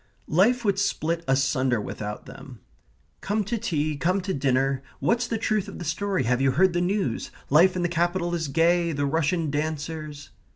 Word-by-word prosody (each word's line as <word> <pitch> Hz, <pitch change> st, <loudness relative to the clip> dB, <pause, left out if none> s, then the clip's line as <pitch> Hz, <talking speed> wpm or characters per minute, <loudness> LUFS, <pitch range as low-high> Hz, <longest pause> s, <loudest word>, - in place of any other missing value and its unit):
Life 235 Hz, +8 st, +3 dB
would 200 Hz, -1 st, +2 dB
split 170 Hz, -4 st, -1 dB
asunder 135 Hz, -2 st, +2 dB
without 105 Hz, 0 st, -6 dB
them. -, -, -11 dB, 0.6 s
"Come 210 Hz, +2 st, 0 dB
to 215 Hz, +4 st, -2 dB
tea, 155 Hz, -8 st, -1 dB
come 185 Hz, +6 st, +1 dB
to 190 Hz, +1 st, -3 dB
dinner, 135 Hz, 0 st, +1 dB, 0.2 s
what's 235 Hz, 0 st, +1 dB
the 230 Hz, -, -1 dB
truth 215 Hz, -2 st, 0 dB
of 200 Hz, -, -8 dB
the 175 Hz, -, -6 dB
story? 185 Hz, +2 st, -1 dB
have 125 Hz, +2 st, +1 dB
you 135 Hz, -, +4 dB
heard 185 Hz, +5 st, +3 dB
the 175 Hz, -, +1 dB
news? 180 Hz, -, -1 dB, 0.2 s
life 175 Hz, +6 st, +5 dB
in 180 Hz, -, -1 dB
the -, -, +2 dB
capital 175 Hz, +1 st, 0 dB
is 165 Hz, -3 st, -1 dB
gay; 170 Hz, +3 st, +2 dB
the 145 Hz, 0 st, -1 dB
Russian 160 Hz, +1 st, 0 dB
dancers...." 155 Hz, 0 st, -4 dB
165 Hz, 180 wpm, -25 LUFS, 145-190 Hz, 0.6 s, life